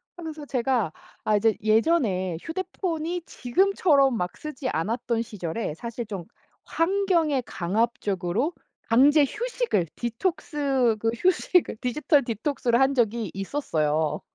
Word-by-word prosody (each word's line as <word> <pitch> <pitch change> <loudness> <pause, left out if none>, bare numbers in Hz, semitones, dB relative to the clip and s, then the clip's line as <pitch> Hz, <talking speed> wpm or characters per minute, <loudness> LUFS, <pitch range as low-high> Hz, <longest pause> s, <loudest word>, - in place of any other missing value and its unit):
하면서 315 -4 -7
제가 250 - 0 0.3
아 215 - +3
이제 220 +1 +2
예전에 215 - +2
휴대폰이 345 -1 -3
지금처럼 280 -2 +2
막 180 -4 -3
쓰지 290 -4 -5
않았던 230 +6 -1
시절에 205 -4 -4
사실 235 +5 -5
좀 200 -5 -6 0.4
환경에 335 -5 +1
강압적으로 205 - -1 0.4
강제 285 +6 +6
휴식을 470 - -1
디톡스 265 - 0
그 225 - +1
휴식을 360 -3 +2
디지털 285 +4 +2
디톡스를 240 +1 0
한 270 +1 +4
적이 230 -5 0
있었어요. 160 - -1
245 Hz, 270 characters per minute, -25 LUFS, 215-310 Hz, 0.4 s, 강제